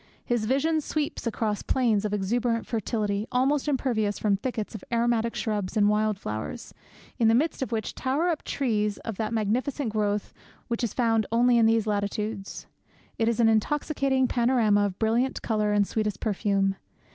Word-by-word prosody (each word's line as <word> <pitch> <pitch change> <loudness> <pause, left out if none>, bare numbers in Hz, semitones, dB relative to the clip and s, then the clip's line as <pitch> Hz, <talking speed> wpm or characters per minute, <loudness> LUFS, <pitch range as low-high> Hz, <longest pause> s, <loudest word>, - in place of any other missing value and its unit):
His 240 -3 0
vision 300 +6 +1
sweeps 295 -4 -3
across 215 -2 -1
plains 225 -6 +1
of 210 - -1
exuberant 230 +3 0
fertility, 215 -2 -2
almost 270 +3 +1
impervious 235 -7 0
from 205 -2 +2
thickets 220 0 -4
of 220 - -8
aromatic 235 -1 +1
shrubs 210 -3 -2
and 205 -1 +4
wild 210 -1 +1
flowers, 110 - -6 0.5
in 230 - +4
the 225 - +5
midst 300 +5 0
of 265 - -2
which 220 -2 -2
tower 285 +7 0
up 325 -4 -2
trees 210 -6 -1
of 225 -4 -4
that 215 0 -2
magnificent 230 +4 -1
growth 210 -1 -1 0.4
which 235 +1 -2
is 230 - 0
found 225 -4 +2
only 240 +1 +4
in 225 - +5
these 225 -1 +2
latitudes. 205 0 -3 0.5
It 225 - +2
is 235 0 0
an 230 - +5
intoxicating 265 +3 +1
panorama 235 -5 +3
of 190 -1 -7
brilliant 235 +4 0
colour 215 -2 0
and 205 -1 +3
sweetest 210 -1 -2
perfume. 195 -2 0
225 Hz, 170 wpm, -26 LUFS, 210-245 Hz, 0.5 s, the